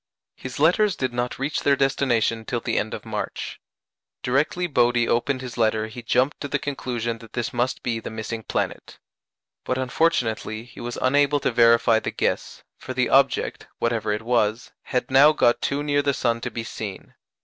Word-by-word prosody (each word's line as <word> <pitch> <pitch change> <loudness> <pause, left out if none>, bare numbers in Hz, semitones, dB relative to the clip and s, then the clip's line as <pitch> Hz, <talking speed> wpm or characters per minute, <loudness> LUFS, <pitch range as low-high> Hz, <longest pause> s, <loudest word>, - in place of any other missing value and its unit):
His 130 0 -7
letters 180 +6 +4
did 130 -2 -2
not 120 0 -2
reach 140 +3 -1
their 140 - +3
destination 125 -5 +1
till 120 +2 -2
the - - 0
end - - -3
of - - -10
March. - - -5 0.6
Directly 145 +8 +1
Bode 120 -7 +2
opened 130 +2 0
his 125 -2 -7
letter 110 -1 +2
he 120 +2 -8
jumped 130 +5 +1
to 145 - -3
the - - 0
conclusion 120 -4 -3
that 115 -1 -14
this 120 -2 -2
must 120 +1 -1
be 115 -2 -1
the - - -7
missing 110 +1 -5
planet. - - -3 0.7
But 130 - -1
unfortunately 125 -5 0
he 120 -1 -14
was 120 0 -5
unable 145 +2 +3
to - - +1
verify 115 -1 +5
the - - -3
guess, - - -2 0.2
for 130 - -7
the 125 -1 +1
object, 135 -1 +2
whatever 115 -2 0
it 105 +1 -2
was, 115 -1 0
had 125 -1 -2
now 140 +3 +7
got 120 -5 +3
too 140 +1 -1
near 145 -1 +2
the 140 -1 0
sun 115 -1 0
to - - -3
be 115 - -5
seen. 105 -3 -7
125 Hz, 185 wpm, -24 LUFS, 115-140 Hz, 0.7 s, now